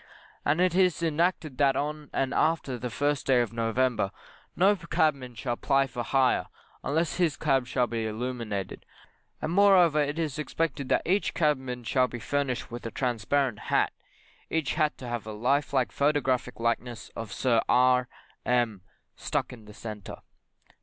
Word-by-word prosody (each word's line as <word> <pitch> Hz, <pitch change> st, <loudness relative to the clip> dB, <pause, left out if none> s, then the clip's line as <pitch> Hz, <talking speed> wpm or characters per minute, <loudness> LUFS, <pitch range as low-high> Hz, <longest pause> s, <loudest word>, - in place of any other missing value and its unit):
And 150 Hz, +3 st, +1 dB
it 180 Hz, -1 st, +3 dB
is 180 Hz, -2 st, +2 dB
enacted 160 Hz, -3 st, 0 dB
that 140 Hz, -2 st, +4 dB
on 150 Hz, +1 st, -3 dB
and 135 Hz, 0 st, -1 dB
after 155 Hz, -6 st, +1 dB
the 125 Hz, +1 st, -3 dB
first 145 Hz, +4 st, -1 dB
day 130 Hz, -2 st, +5 dB
of 120 Hz, -2 st, -1 dB
November 115 Hz, -2 st, +1 dB, 0.5 s
no 195 Hz, +4 st, +4 dB
cabman 145 Hz, -8 st, 0 dB
shall 120 Hz, +2 st, -3 dB
ply 135 Hz, 0 st, +2 dB
for 120 Hz, -2 st, -5 dB
hire, 130 Hz, +1 st, +2 dB, 0.4 s
unless 155 Hz, -1 st, 0 dB
his 170 Hz, -5 st, +1 dB
cab 135 Hz, -4 st, +1 dB
shall 125 Hz, 0 st, +1 dB
be 115 Hz, -1 st, -3 dB
illuminated; 110 Hz, -3 st, -4 dB, 0.6 s
and 155 Hz, -, -1 dB
moreover, 180 Hz, -5 st, +5 dB
it 145 Hz, +1 st, -1 dB
is 155 Hz, -3 st, -2 dB
expected 150 Hz, -3 st, -2 dB
that -, -, +2 dB
each 195 Hz, +4 st, +1 dB
cabman 130 Hz, -6 st, 0 dB
shall 125 Hz, +2 st, +2 dB
be 120 Hz, -, -6 dB
furnished 130 Hz, 0 st, -2 dB
with 120 Hz, 0 st, -6 dB
a -, -, -3 dB
transparent 125 Hz, 0 st, 0 dB
hat, -, -, +2 dB, 0.6 s
each 160 Hz, -4 st, 0 dB
hat 155 Hz, -1 st, +1 dB
to 125 Hz, -, -8 dB
have 120 Hz, -2 st, -4 dB
a 110 Hz, -, -5 dB
life 130 Hz, +7 st, +1 dB
like -, -, +1 dB
photographic 135 Hz, -4 st, 0 dB
likeness 115 Hz, 0 st, -2 dB
of 115 Hz, -3 st, -6 dB
Sir 120 Hz, -1 st, +2 dB
R 125 Hz, 0 st, +4 dB, 0.4 s
M 120 Hz, -5 st, +1 dB, 0.3 s
stuck -, -, -2 dB
in 115 Hz, -3 st, -13 dB
the 105 Hz, -, -12 dB
centre. 105 Hz, -4 st, -8 dB
130 Hz, 165 wpm, -28 LUFS, 120-150 Hz, 0.6 s, day